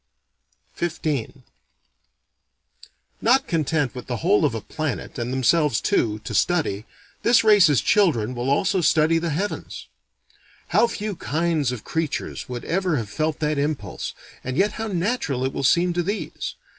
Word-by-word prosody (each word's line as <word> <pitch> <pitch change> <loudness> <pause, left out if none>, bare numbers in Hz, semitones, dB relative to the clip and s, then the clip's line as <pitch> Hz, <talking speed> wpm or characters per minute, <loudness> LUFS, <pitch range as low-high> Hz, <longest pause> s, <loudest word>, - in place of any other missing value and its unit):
XV 145 -6 -3 1.8
Not 255 +4 +4
content 155 -5 0
with 125 - -8
the 125 - -2
whole 190 -3 +4
of 130 -6 0
a - - -2
planet 150 -1 -4
and 120 +1 -2
themselves 130 0 +2
too, 105 -2 +1
to - - -6
study, 145 - +1 0.4
this 235 0 +4
race's 195 - +5
children 130 - +2
will 120 +1 -2
also 185 +6 +2
study 160 0 +3
the 170 0 -2
heavens. 185 +7 -4 0.8
How 235 - +4
few 210 -3 -4
kinds 155 -1 0
of 125 -4 -6
creatures 160 -5 -3
would 125 -1 -5
ever 180 -2 0
have 110 -5 -4
felt 155 0 -1
that 150 -1 0
impulse, 145 0 -3 0.3
and 130 +1 -4
yet 205 +2 +3
how 225 +1 -4
natural 175 - -1
it 130 - -2
will - - -3
seem 175 +6 +3
to 175 - 0
these! 200 +5 -4
155 Hz, 150 wpm, -23 LUFS, 130-180 Hz, 1.8 s, race's